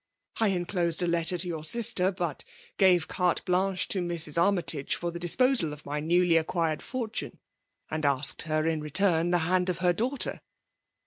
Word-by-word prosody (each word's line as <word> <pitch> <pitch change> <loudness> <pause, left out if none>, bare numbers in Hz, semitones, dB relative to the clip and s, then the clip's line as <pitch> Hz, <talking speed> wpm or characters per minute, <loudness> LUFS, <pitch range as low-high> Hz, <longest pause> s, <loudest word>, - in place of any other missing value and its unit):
I 225 - +3
enclosed 175 -2 0
a - - 0
letter 170 +1 +1
*to 180 - +1
your 160 -3 -5
sister; 195 0 +1
but 180 -2 -4 0.4
gave 180 -5 +4
carte 180 -2 -1
blanehe 185 +1 0
to 190 - -1
Mrs. 170 -4 -1
Army 175 +1 +2
' - - +6
i«ge 140 -1 -2
for 175 0 -4
the 170 - -7
disposal 175 - +2
of 150 - -12
my 150 +1 -3
newiy 170 0 +2
acqttired 165 -2 -1
fortune^ 230 -4 -5 0.5
and 155 -1 -3
asked 140 -1 +1
her 155 0 0
in 160 -1 -1
return 165 +2 +2
the 175 - +3
hand 180 +1 +1
of 180 - -2
her 180 0 +2
daughter." 250 +8 -2
175 Hz, 185 wpm, -27 LUFS, 160-185 Hz, 0.5 s, '